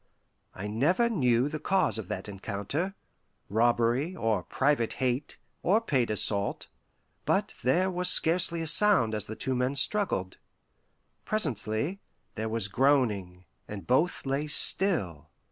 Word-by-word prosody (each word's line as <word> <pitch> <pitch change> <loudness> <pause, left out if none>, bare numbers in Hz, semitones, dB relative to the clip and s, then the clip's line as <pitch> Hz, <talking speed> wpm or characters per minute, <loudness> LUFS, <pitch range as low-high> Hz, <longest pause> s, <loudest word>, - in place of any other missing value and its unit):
I 95 - -6
never 155 - +1
knew 125 - +2
the 155 +1 -5
cause 165 -7 +1
of 105 - -7
that 95 +2 -5
encounter 105 - -4 0.5
robbery, 120 - +1
or 115 - 0
private 135 -4 0
hate, 130 +1 -2 0.2
or 200 +5 +3
paid 135 - 0
assault; 100 -1 0 0.5
but - - 0
there 180 +10 +1
was 180 0 +1
scarcely 170 -1 +2
a - - -4
sound 165 - +5
as 105 -2 -4
the 110 - -6
two 130 - -3
men 125 +2 -1
struggled. 140 - +1 0.8
Presently, 145 - -2 0.3
there 110 0 -4
was 110 -3 -1
groaning, 100 -7 0 0.2
and 105 -2 -8
both 155 +8 +1
lay 140 +3 -1
still. 125 - -1
130 Hz, 130 wpm, -28 LUFS, 110-170 Hz, 0.8 s, sound